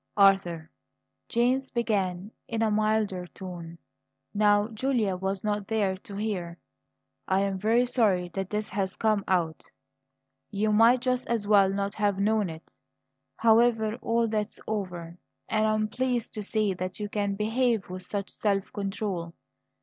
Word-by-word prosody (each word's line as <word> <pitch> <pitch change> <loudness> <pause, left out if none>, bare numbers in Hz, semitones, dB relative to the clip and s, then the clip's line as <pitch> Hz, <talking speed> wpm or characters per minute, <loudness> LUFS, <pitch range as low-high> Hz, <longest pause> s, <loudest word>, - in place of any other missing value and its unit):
"Arthur," 180 -5 +3 0.6
James 255 +3 +1
began 200 -5 -1 0.2
in 225 -1 -1
a 220 - +2
milder 215 -4 +1
tone, 175 -3 -9 0.6
now 205 0 +4
Julia 225 -4 0
was 190 +1 -3
not 205 -1 -1
there 205 -4 +1
to 200 +1 -10
hear, 190 -5 -3 0.7
"I 190 +1 +2
am 195 -1 -1
very 230 +5 +3
sorry 205 -8 +1
that 195 +2 -4
this 210 0 -2
has 190 -1 -2
come 215 -3 +1
out. 170 -4 0 0.9
You 215 +1 0
might 230 +3 +5
just 255 0 0
as 230 -3 -1
well 200 -2 +5
not 200 0 -2
have 205 -2 0
known 210 -1 +1
it. 160 0 -8 0.7
However, 225 -1 +4
all 230 0 +1
that's 215 -1 -2
over; 180 -5 -4 0.3
and 215 0 +2
I 215 - +2
am 215 0 0
pleased 245 0 -1
to 215 - -4
see 210 -1 0
that 185 +1 -5
you 210 - -2
can 205 -1 -1
behave 225 0 +1
with 185 +1 -6
such 200 +1 -4
self 200 -2 -1
control. 195 -4 -3
205 Hz, 150 wpm, -27 LUFS, 190-220 Hz, 0.9 s, might